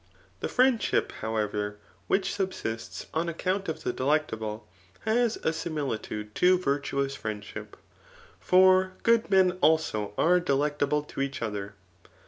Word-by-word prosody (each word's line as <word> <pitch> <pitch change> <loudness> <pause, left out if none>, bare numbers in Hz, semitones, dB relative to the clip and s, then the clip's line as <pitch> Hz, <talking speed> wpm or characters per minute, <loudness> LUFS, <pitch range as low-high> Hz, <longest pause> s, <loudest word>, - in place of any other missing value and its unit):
The - - -3
friendship, 255 -2 +2
however, 105 -1 -2 0.3
which 195 - +1
subsists 185 - -4
on 165 +2 0
account 185 +4 -1
bf 160 - -4
the 125 - -1
delectable, 110 -7 -1 0.3
has 230 +1 +1
a 160 - +1
similitude 130 -10 -4
to 180 +1 +4
virtuous 140 -3 -1
friendship; 105 -4 -7 0.6
for 185 0 +5
good 230 -1 +3
men 185 -2 +4
also 110 -11 +2
are 180 +2 +4
delectable 145 -1 +1
to 145 - -6
each 135 -3 -2
other. 100 -2 -4
150 Hz, 120 wpm, -28 LUFS, 110-185 Hz, 0.6 s, for